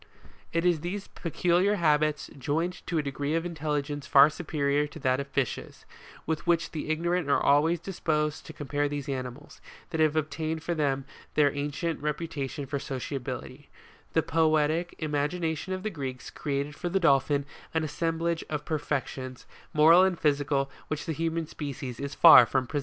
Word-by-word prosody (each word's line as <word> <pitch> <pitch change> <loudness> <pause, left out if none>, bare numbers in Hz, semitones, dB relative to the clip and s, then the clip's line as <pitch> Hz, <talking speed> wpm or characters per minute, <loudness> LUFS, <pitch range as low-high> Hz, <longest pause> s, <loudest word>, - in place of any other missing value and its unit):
It 165 +1 0
is 175 -3 +3
these 190 +5 -5
peculiar 180 +4 +1
habits, 150 -4 +1
joined 155 +6 -2
to 170 - -1
a 155 - +1
degree 145 +2 -2
of 165 +1 0
intelligence 150 -3 -3
far 140 +2 +7
superior 150 -3 0
to 145 - -11
that 130 -3 +1
of 140 - -4
fishes, 140 -3 -3 0.4
with 160 +1 -3
which 170 -1 +2
the 155 -1 -5
ignorant 170 0 0
are - - +4
always 155 +4 +3
disposed 155 -4 -2
to - - -7
compare 145 0 -1
these 145 -1 -4
animals, 130 +1 -6 0.3
that 160 - -2
have 155 -1 +3
obtained 155 +1 -2
for 170 - -1
them 140 -4 0 0.3
their 145 -2 +4
ancient 145 +3 -2
reputation 150 -2 -3
for 140 +1 -3
sociability; 135 -1 -5 0.4
the - - +3
poetic 155 +1 +1
im 155 -2 -4
agination 160 +4 -1
of 185 0 -3
the 215 - -2
Greeks 135 -6 -6
created 140 0 -3
for 175 - -3
the 195 +2 +1
Dolphin 140 -3 +3 0.3
an 160 -1 0
assemblage 165 +1 -1
of 150 -1 -3
perfections, 135 -4 -3 0.3
moral 160 +4 +7
and 185 -2 +2
physical, 140 -2 +1 0.2
which 155 -1 -3
the 160 - -2
human 165 +1 -1
species 140 -5 -6
is 140 +1 -4
far 165 - +9
from 130 -1 0
possessing. 145 +4 -2
150 Hz, 170 wpm, -28 LUFS, 140-165 Hz, 0.4 s, far